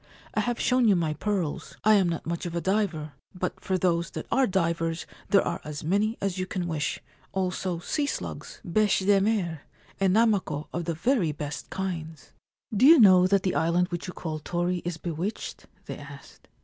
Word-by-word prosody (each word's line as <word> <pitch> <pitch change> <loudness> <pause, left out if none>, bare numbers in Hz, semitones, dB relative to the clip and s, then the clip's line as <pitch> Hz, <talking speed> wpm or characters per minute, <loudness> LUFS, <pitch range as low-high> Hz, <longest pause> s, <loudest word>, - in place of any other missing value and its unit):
I - - 0
have 240 -1 -1
shown 250 -2 +3
you 205 - +5
my 165 -3 0
pearls. 175 -1 -3
I 215 - +6
am 195 -4 +4
not 165 - -3
much 170 +1 -3
of 170 - -6
a - - +1
diver; 175 -6 -1 0.2
but, 180 0 -3
for 190 -1 -1
those 170 -2 +1
that - - -6
are 265 -1 +3
divers 165 -3 0 0.2
there 200 0 +5
are - - -2
as 150 -1 -6
many 205 +7 +1
as 195 -2 -2
you 185 - -2
can 180 -2 -3
wish 155 -4 -2 0.2
— - - -32
also 185 -1 -1
sea 285 - -1
slugs, - - -5
beche 205 +1 +2
de 200 -1 +5
mer, 190 -7 0 0.4
and 190 -1 +3
namako 200 -10 +2
of 170 -1 -2
the 165 -1 -2
very 195 - +1
best 145 0 -6
kinds/ 165 -6 -5 0.4
'Do 250 +7 +6
you 325 0 +9
know 185 -4 +7
that 195 -1 +2
the 185 - 0
island 175 +2 +2
which 175 0 -4
you 180 - -6
call 155 -2 -4
"Tori" 175 +3 -1
is 175 -1 -4
bewitched? 170 +5 -5
' - - -34
they - - -6
asked. - - -13
180 Hz, 200 wpm, -27 LUFS, 165-200 Hz, 0.4 s, you